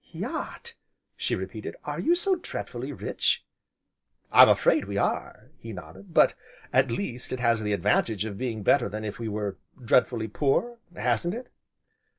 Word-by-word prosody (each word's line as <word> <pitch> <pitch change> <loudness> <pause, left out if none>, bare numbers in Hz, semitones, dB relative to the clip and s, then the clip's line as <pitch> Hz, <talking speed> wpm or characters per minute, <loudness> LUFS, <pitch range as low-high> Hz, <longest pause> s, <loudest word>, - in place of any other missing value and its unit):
"Yacht!" 470 0 -5 0.4
she - - -1
repeated, - - -6
"are - - -4
you 345 - +3
so 380 +2 +2
dreadfully 135 - -5
rich?" 140 - 0 0.9
"I'm - - +9
afraid - - +4
we 100 0 -4
are," 100 - -2
he 115 -1 -8
nodded, 90 +1 -11
"but, - - +5 0.4
at 130 +1 +4
least, 125 -2 -4
it 130 - -2
has 115 -2 +2
the 105 -1 0
advantage 105 +1 +1
of 105 -3 -5
being 110 -2 -3
better 120 +1 +4
than 110 +2 -5
if 105 +1 -5
we 115 - -3
were 105 -2 -3 0.2
dreadfully 120 -2 +2
poor, 150 - 0 0.2
hasn't 125 - 0
it?" 245 +1 -8
115 Hz, 160 wpm, -27 LUFS, 105-135 Hz, 0.9 s, I'm